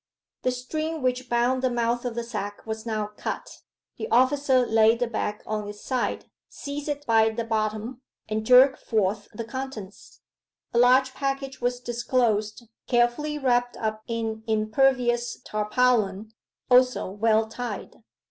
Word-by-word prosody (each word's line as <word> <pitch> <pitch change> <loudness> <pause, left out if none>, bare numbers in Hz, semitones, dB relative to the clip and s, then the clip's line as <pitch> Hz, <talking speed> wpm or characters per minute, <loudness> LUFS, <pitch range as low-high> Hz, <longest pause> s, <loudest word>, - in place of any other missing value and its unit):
The - - +1
string 310 +5 -3
which 255 0 -1
bound 245 +2 +2
the 260 - +2
mouth 240 0 -1
of 240 -2 -3
the 235 - -2
sack 210 -3 -6
was 220 +1 -5
now 215 -2 -2
cut. - - -5 0.4
The 445 - -4
officer 260 - +3
laid 225 0 +4
the 245 - 0
bag 215 -2 -3
on 215 -1 -3
its 205 0 -9
side, 255 -2 -1 0.2
seized 290 +1 -6
it 290 0 -3
by 225 -1 +4
the 225 +1 -3
bottom, 220 +2 -2 0.3
and 215 0 -2
jerked 255 +3 +6
forth 205 -1 0
the 230 +1 -6
contents. 235 -5 -8 0.5
A 235 - +3
large 255 +2 +5
package 275 -1 -3
was 245 0 0
disclosed, 235 -3 0 0.2
carefully 245 +5 +1
wrapped 245 -3 +1
up 215 -1 -3
in 225 -1 -3
impervious 240 +2 +1
tarpaulin, 215 -1 +1 0.4
also 250 0 +4
well 220 +2 +2
tied. 245 +2 -6
240 Hz, 145 wpm, -25 LUFS, 220-255 Hz, 0.5 s, jerked